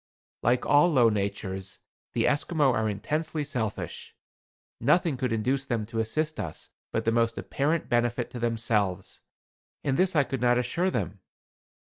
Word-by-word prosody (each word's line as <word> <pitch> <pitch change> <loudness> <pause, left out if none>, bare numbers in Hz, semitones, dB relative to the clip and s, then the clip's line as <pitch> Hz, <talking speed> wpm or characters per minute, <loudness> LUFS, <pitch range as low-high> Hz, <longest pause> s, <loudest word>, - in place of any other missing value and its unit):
Like 120 +2 +2
all 145 +5 +5
low 125 -6 +5
natures, 100 -2 -3 0.4
the - - +1
Esquimaux 150 -1 +2
are 110 -1 +1
intensely 155 +9 -2
selfish. 125 -7 -4 0.6
Nothing 150 +4 +3
could 125 -1 -2
induce 125 +5 0
them 115 -5 -1
to 115 +1 -4
assist 155 +8 -1
us 80 - -5 0.2
but - - -1
the 115 - +3
most 115 0 +1
apparent 155 +4 -1
benefit 120 0 0
to 125 - -6
themselves; 110 -5 -1 0.6
and 135 -1 0
this 185 0 +3
I 145 - +5
could 135 -2 -4
not 120 0 +4
assure 170 +9 0
them. 100 - -3
120 Hz, 150 wpm, -27 LUFS, 110-145 Hz, 0.6 s, all